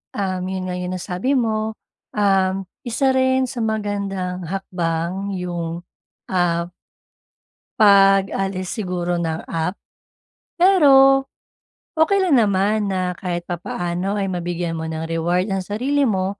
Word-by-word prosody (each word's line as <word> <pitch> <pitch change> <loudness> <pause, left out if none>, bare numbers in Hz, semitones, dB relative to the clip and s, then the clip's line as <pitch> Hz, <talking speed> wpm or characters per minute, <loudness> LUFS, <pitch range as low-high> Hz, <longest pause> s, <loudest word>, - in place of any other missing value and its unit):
Um, 185 -2 -2
yun 190 -1 -3
nga 180 - -3 0.2
nasabi 185 +8 -1
mo, 220 -2 -1 0.4
um, 195 -2 +3 0.3
isa 245 +2 -1
rin 260 0 +2
sa 245 -1 -5
magandang 200 -4 -2
hakbang 185 +1 -2
yung, 175 -1 -4 0.4
ah 175 -2 0 1.1
pag-alis 195 -2 +4
siguro 180 -4 -2
ng 160 -1 -3
app. 165 +3 -2 0.8
Pero, 275 -7 +6 0.7
okey 355 +6 +4
lang 310 -9 +4
naman 205 0 +2
na 185 -2 -1
kahit 175 -2 -3
papaano 175 +2 -3
ay 195 -2 -1
mabigyan 175 -1 -3
mo 160 - -4
ng 160 0 -4
reward 175 +4 0
ang 195 -1 -1
sarili 270 +8 0
mo 195 -1 -1
190 Hz, 115 wpm, -21 LUFS, 175-215 Hz, 1.1 s, Pero